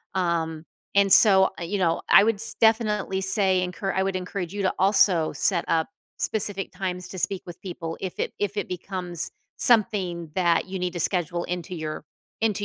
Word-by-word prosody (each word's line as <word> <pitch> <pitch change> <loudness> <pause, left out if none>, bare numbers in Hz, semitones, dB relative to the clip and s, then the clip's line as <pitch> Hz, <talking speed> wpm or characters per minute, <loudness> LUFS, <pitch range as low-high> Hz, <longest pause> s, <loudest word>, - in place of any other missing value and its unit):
um, 165 -3 -2 0.3
and 200 -1 +3
so, 190 -1 +6
uh, - - -5
you 200 +4 -3
know, 165 -2 +1
I 200 - +7
would 225 0 +2
s 200 - +3
definitely 210 -4 +1
say 190 -1 +3
encour 195 +2 -4
I 190 - +1
would 195 -1 -2
encourage 180 0 -5
you 205 - -3
to 185 - +1
also 190 -4 +4
set 175 -3 +1
up 160 -1 +1 0.3
specific 205 -2 -1
times 180 -2 -5
to 190 - -8
speak 190 +2 -1
with 175 - -10
people 165 -3 -6
if 185 -2 -6
it - - -2
if 205 0 -2
it 205 - -2
becomes 180 -2 -3 0.3
something 185 -8 +2
that 175 -2 +2
you 190 0 -5
need 180 0 -3
to 175 - -5
schedule 175 -2 -1
into 180 0 -5
your 155 -1 -6 0.4
into 210 -2 0
185 Hz, 190 wpm, -24 LUFS, 175-200 Hz, 0.4 s, I